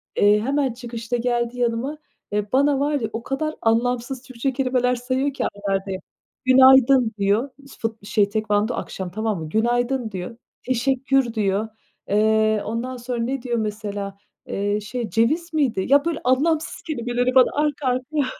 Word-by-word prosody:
Eee, 205 +1 +4
hemen 270 0 0
çıkışta 235 -1 -4
geldi 240 0 -1
yanıma 240 +5 -1 0.4
ve 210 0 -1
bana 280 +1 +3
var 290 0 +1
ya 220 - -2
o 230 +1 -4
kadar 310 +3 -2
anlamsız 245 +2 0
Türkçe 260 0 -3
kelimeler 250 -1 +1
sayıyor 260 +3 -1
ki - - -3
aralarda, 195 -1 -2 0.5
"günaydın" 260 -2 +6
diyor 205 +7 +1 0.3
fut 225 -2 -4
şey 205 -2 +2
tekvando 215 +2 0
akşam, 185 -2 -5
tamam 215 0 -2
mı? 160 -1 -6
"Günaydın" 240 +3 0
diyor. 190 +4 -6 0.3
"Teşekkür" 260 0 +1
diyor. 210 0 0 0.4
Eee, 215 +1 +3
ondan 240 +4 -3
sonra 240 0 -4
ne 260 +1 -2
diyor 240 -2 -2
mesela? 205 -2 -4 0.3
Eee, 205 +1 -1
şey, 215 +1 -4
ceviz 310 - +1
miydi? 255 -11 +1
Ya 285 +3 +5
böyle 335 -2 -1
anlamsız 300 +6 +1
kelimeleri 245 -3 -1
bana 255 - +6
arka 290 -2 -2
arkaya 260 +4 0
240 Hz, 150 wpm, -22 LUFS, 215-265 Hz, 0.5 s, günaydın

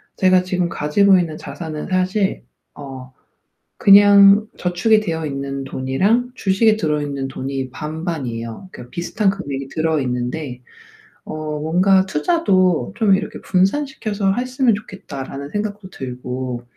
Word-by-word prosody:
제가 185 -1 +4
지금 180 -1 -1
가지고 190 +6 +3
있는 165 -3 -2
자산은 155 -3 -7
사실 185 - 0 0.3
어 130 -2 -10 0.7
그냥 200 +1 +7
저축이 180 +5 +2
되어 160 -6 -3
있는 140 -1 -4
돈이랑 190 - 0
주식에 215 +2 +2
들어 150 -6 -1
있는 140 -2 -3
돈이 135 0 -4
반반이에요. 150 - -5
그러니까 125 0 -11
비슷한 195 +4 0
금액이 140 -9 -5
들어 160 0 0
있는데 125 +1 -4 0.6
어 - - -7 0.3
뭔가 185 +5 +3
'투자도 185 - +1
좀 210 -4 +4
이렇게 - - -5
분산시켜서 205 0 0
했으면 250 0 +1
좋겠다.'라는 140 -8 -8
생각도 205 -1 -4
들고 125 -3 -5
175 Hz, 300 characters per minute, -20 LUFS, 135-200 Hz, 0.7 s, 그냥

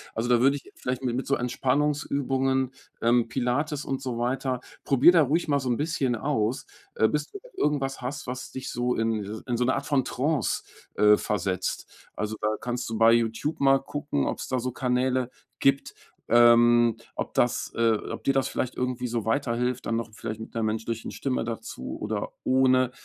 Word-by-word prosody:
Also, 115 +2 -1
da 120 -1 +5
würde 135 +2 +4
ich 140 - -10
vielleicht 130 +1 -3
mit 120 -2 0
mit 130 - -3
so 140 - +3
Entspannungsübungen, 135 0 0 0.3
ähm, 120 0 +3
Pilates 140 +5 -1
und 135 -1 -3
so 125 -3 -3
weiter, 125 +1 -1 0.2
probier 135 +5 +6
da 170 -2 +5
ruhig 155 +5 +1
mal 145 -2 +2
so 130 -2 -3
'n 120 - +1
bisschen 145 -5 0
aus, 120 -2 -1 0.3
äh, 110 - +4
bis 150 +6 -2
du 405 - -8 0.2
irgendwas 135 -3 -1
hast, 135 +3 -5
was 125 +1 -5
dich 130 +1 -6
so 125 0 -1
in 115 -1 0
dieses 105 +2 -6
in 120 -2 -2
so 125 - +1
'ne 130 - +2
Art 140 - -3
von 135 -1 +2
Trance, 140 +2 -1 0.3
äh, 105 0 +6
versetzt. 95 -3 -2 0.3
Also, 105 0 -3
da - - +1
kannst 120 -1 -3
du 115 - -3
bei 115 +1 +6
YouTube 115 +6 0
mal 135 -1 +5
gucken, 140 - -2
ob's - - -3
da 130 - 0
so 125 +1 -2
Kanäle 125 0 0 0.3
gibt, 135 0 +2 0.4
ähm, 120 0 +6 0.2
ob - - -4
das 120 0 +1
äh, 115 -1 +3 0.2
ob - - -6
dir 135 - +2
das 135 -1 +1
vielleicht 130 - -3
irgendwie 125 0 -2
so 115 -2 -2
weiterhilft, 125 +1 0
dann 115 - 0
noch 115 -1 -4
vielleicht 110 0 -6
mit 110 - -9
'ner 115 - -1
menschlichen 110 +1 -3
Stimme 130 -4 -2
dazu 115 - -6
oder - - -3
ohne. 130 -1 +3
125 Hz, 195 wpm, -26 LUFS, 115-135 Hz, 0.4 s, probier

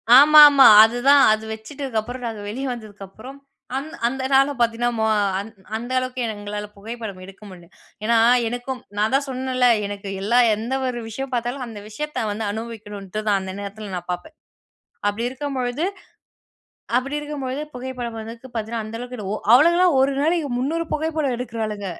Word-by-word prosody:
ஆமாமா. 290 0 +9 0.2
அதுதான். 245 +5 +5
அது 215 0 -3
வச்சுட்டுதுக்கப்புறம் 245 0 -5
நாங்க 220 -2 -6
வெளிய 260 +6 -4
வந்ததுக்கப்புறம் 215 +4 -11 0.4
அந்த 310 +4 -6
அந்த 260 +2 -3
நாள 275 +1 +5
பாத்தீங்கன்னா 235 0 +1
மொ 220 - +1 0.3
அந் 205 +3 -6 0.3
அந்த 240 +3 -7
அளவுக்கு 255 0 -4
எங்களால 205 0 -6
புகைப்படம் 215 -1 -7
எடுக்க 195 +2 -15
முடில. 180 -2 -13 0.4
ஏன்னா 230 +1 +3 0.3
எனக்கும் 245 +2 -4 0.2
நான் 215 +4 +1
தான் 280 +1 +1
சொன்னேல்ல, 255 -1 0 0.2
எனக்கு 200 0 -6
எல்லா 235 +5 +3 0.2
எந்த 230 +5 -4
ஒரு 240 -1 -3
விஷயம் 270 +4 -6
பாத்தாலும் 245 +2 -2
அந்த 220 -3 -9
விஷயத்த 300 +2 -4
வந்து 215 +1 -3
அனுபவிக்கணுன்ட்டு 215 -2 -6
தான் 200 -2 +3
அந்த 190 0 -6
நேரத்ல் 200 0 -7
நான் 175 0 -7
பாப்பேன். 175 - -6 0.7
அப்படி 205 +3 -1
இருக்கம் 275 +2 -5
பொழுது 250 +4 -2 1.1
அப்படி 270 +3 -1
இருக்கும்பொழுது 290 -2 -4
புகைப்படம் 250 -2 -6
வந்து 225 +1 -7 0.2
பாத்தீங்கன்னா 225 0 -3
அந்த 215 +1 -7
அளவுக்கு 250 +1 -7
எடு 205 - -6
ஒ 215 - -1 0.2
அவளுங்கலாம் 345 +6 +5
ஒரு 275 +1 +3
நாளைக்கு 320 0 +1
300 320 +6 -1
புகைப்படம் 310 -4 -1
எடுக்குறாளுங்க. 220 -4 -4
240 Hz, 155 wpm, -22 LUFS, 215-270 Hz, 1.1 s, ஆமாமா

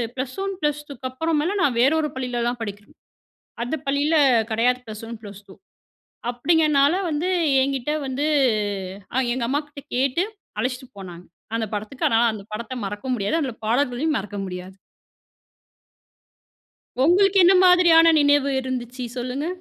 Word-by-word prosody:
Plus 260 +3 -5
1 390 0 -3
plus 295 0 0
2 270 -2 -6
அப்புறமேல 325 +6 -1
நான் 255 -5 +1
வேறு 270 +5 +4
ஒரு 300 - -2
பள்ளில 250 -2 -2
தான் 245 0 -5
படிக்கறேன் 205 -1 -9 0.7
அந்த 265 +6 -2
பள்ளியில 285 +3 +1 0.4
கடையாது 245 +3 +2
ப்ளஸ் 215 0 -8
1 235 - -7
ப்ளஸ் 205 -1 -10
2. 190 - -13 0.8
அப்டிங்கனால 295 +2 +3 0.2
வந்து 315 +4 -1 0.3
என்கிட்டே 275 +2 -1
வந்து 265 +3 -2 0.9
அ - - +1 0.2
எங்க 250 -1 -3
அம்மாகிட்ட 290 +1 -3
கேட்டு 270 +6 +1 0.4
அழைச்சிட்டு 255 +3 -3
போனாங்க 180 -2 -10 0.3
அந்த 230 -1 -1
படத்துக்கு. 215 +6 -4
அதனா 225 0 +3
அந்த 210 -2 -8
படத்த 235 +4 -5
மறக்க 205 +5 -6
முடியாது. 205 +4 -1
அதனால 265 -7 -3
பாடல்களையும் 255 +6 0
மறக்க 205 +1 -6
முடியாது. 180 0 -8 2.3
உங்களுக்கு 390 +5 +4
என்ன 370 +2 +6
மாதிரியான 340 -2 +6
நினைவு 285 -1 +3
இருந்துச்சு? 255 -1 -5
சொல்லுங்க. 255 +4 -3
260 Hz, 140 wpm, -23 LUFS, 235-295 Hz, 2.3 s, என்ன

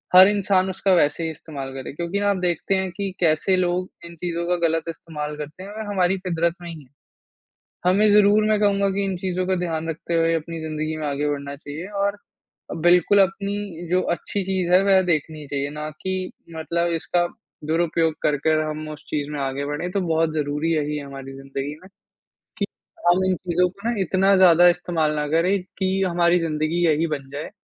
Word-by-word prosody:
हर 185 +1 +10
इंसान 195 -2 +2
उसका 190 +1 +1
वैसे 155 0 +2
ही 160 - -2
इस्तेमाल 140 -4 -8
करे 135 -1 -6
क्योंकि 170 +6 -2
आप 195 - -1
देखते 180 +1 0
हैं 190 -1 -1
कि 195 +2 -3
कैसे 170 +3 +3
लोग 180 0 0 0.2
इन 170 - -10
चीज़ों 170 0 -3
का 180 - +2
गलत 165 0 0
इस्तेमाल 150 -2 -6
करते 150 +5 -8
हैं 200 - -9
और 215 0 -6
हमारी 190 0 +2
फितरत 170 -2 -1
में 175 - -7
ही 160 -2 -9
है। 130 - -24 1.0
हमें 205 +4 +4
ज़रूर, 210 +1 +5
मैं 215 -1 +3
कहूँगा 200 -1 +3
कि 200 +1 -1
इन 195 -1 -2
चीज़ों 185 0 -2
का 190 - +2
ध्यान 165 -1 -3
रखते 165 +1 -4
हुए 165 0 +3
अपनी 165 +1 -4
ज़िंदगी 155 0 -3
में 155 - -4
आगे 145 +1 -1
बढ़ना 140 -1 -4
चाहिए 150 +4 -8 0.2
और 200 +1 0 0.7
बिल्कुल 180 +3 +5
अपनी 195 -2 -2
जो 180 0 +3 0.2
अच्छी 200 - -4
चीज़ 185 -2 -1
है, 185 +1 +6
वह 195 -1 +5
देखनी 155 -4 -2
चाहिए, 140 0 -2
ना 150 +1 -5
कि 185 -1 -3 0.2
मतलब 170 +2 -1
इसका 175 0 +1 0.4
दुरुपयोग 165 0 +1
करके 150 +1 +1
हम 155 0 -4
उस 150 -1 -9
चीज़ 145 -1 -2
में 150 - -4
आगे 135 +1 -2
बढ़ें। 145 +5 -3
तो 200 - 0
बहुत 165 -2 +1
ज़रूरी 150 +1 -1
यही 150 -1 -1
है 145 - -6
हमारी 135 -1 -8
ज़िंदगी 135 +1 -5
में, 185 - -15 0.7
कि - - 0 0.4
हम 185 +2 +4
इन 185 0 +2
चीज़ों 180 0 +1
को 225 +5 -5
ना - - +1
इतना 190 +2 +3
ज़्यादा 175 -2 +7
इस्तेमाल 170 -3 0
ना 150 -1 -1
करें 175 +6 +2 0.2
कि 190 0 +1
हमारी 175 -1 +3
ज़िंदगी 160 +1 -1
यही 160 0 +2
बन 135 -2 -10
जाए। 145 +2 -5
170 Hz, 200 wpm, -23 LUFS, 155-185 Hz, 1.0 s, हर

